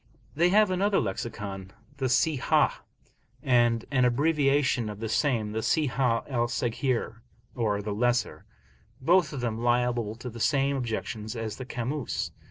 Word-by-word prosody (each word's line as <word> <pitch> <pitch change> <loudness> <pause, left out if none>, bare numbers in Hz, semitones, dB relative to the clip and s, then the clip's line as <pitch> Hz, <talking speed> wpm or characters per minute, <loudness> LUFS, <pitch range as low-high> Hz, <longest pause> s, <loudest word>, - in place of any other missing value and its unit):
They 170 +4 +3
have 210 +1 +4
another 195 +2 +2
Lexicon, 95 -2 -5 0.2
the 135 -2 0
Sihah, 130 +2 +2 0.6
and 120 -3 +3
an 130 -2 +3
abbreviation 135 -2 +2
of 105 -1 -7
the 115 - -3
same, 110 -2 0
the 110 - -2
Sihah 130 -5 +1
al 120 -3 0
Saghir 120 0 -1 0.4
(or 105 -4 -1
the 105 0 -3
lesser), 120 +3 0 0.6
both 170 +3 +3
of 140 -4 -5
them 115 -2 -2
liable 120 -2 +1
to 120 +1 -7
the 115 - -9
same 140 +3 +2
objections 110 -3 -4
as 110 -2 -4
the 130 - -6
Kamus. 125 +3 -3
120 Hz, 145 wpm, -27 LUFS, 115-140 Hz, 0.6 s, have